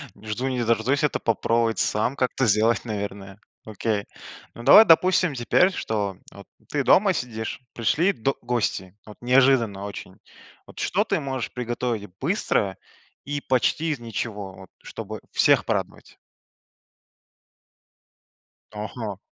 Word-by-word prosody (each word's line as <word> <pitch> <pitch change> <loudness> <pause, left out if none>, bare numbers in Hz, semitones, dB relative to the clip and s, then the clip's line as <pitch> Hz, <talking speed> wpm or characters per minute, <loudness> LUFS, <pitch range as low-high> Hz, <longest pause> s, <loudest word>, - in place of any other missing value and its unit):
не 105 +2 -15
жду, 115 +5 -2
не 125 -2 -1
дождусь 115 +5 +1
это 150 - +1
попробовать 115 0 0
сам 110 +5 0
как-то 130 0 0
сделать, 110 +2 +2
наверное. 100 -2 -6 0.3
Окей. 110 -1 -2 0.5
Ну 115 - -10
давай, 175 - +9
допустим, 180 -1 +4
теперь, 135 +9 +3
что 105 - -3
вот 100 -1 -13 0.2
ты 145 -1 -1
дома 195 +7 +4
сидишь, 110 -6 -5
пришли 155 - +2
до 135 +1 -1
гости, 110 -6 -2
вот 105 - -12
неожиданно 125 -5 +3
очень. 100 -1 -9 0.5
Вот, - - -12
что - - +1
ты - - -1
можешь 130 -3 -4
приготовить 120 -3 -3
быстро 130 - 0 0.5
и 145 0 -3
почти 135 +6 +1
из 145 - -3
ничего, 105 -4 -5
вот 95 -1 -14
чтобы 110 -2 -7
всех - - +3
порадовать? - - -4 2.6
Ага. 105 -1 -6
115 Hz, 125 wpm, -24 LUFS, 105-135 Hz, 2.6 s, давай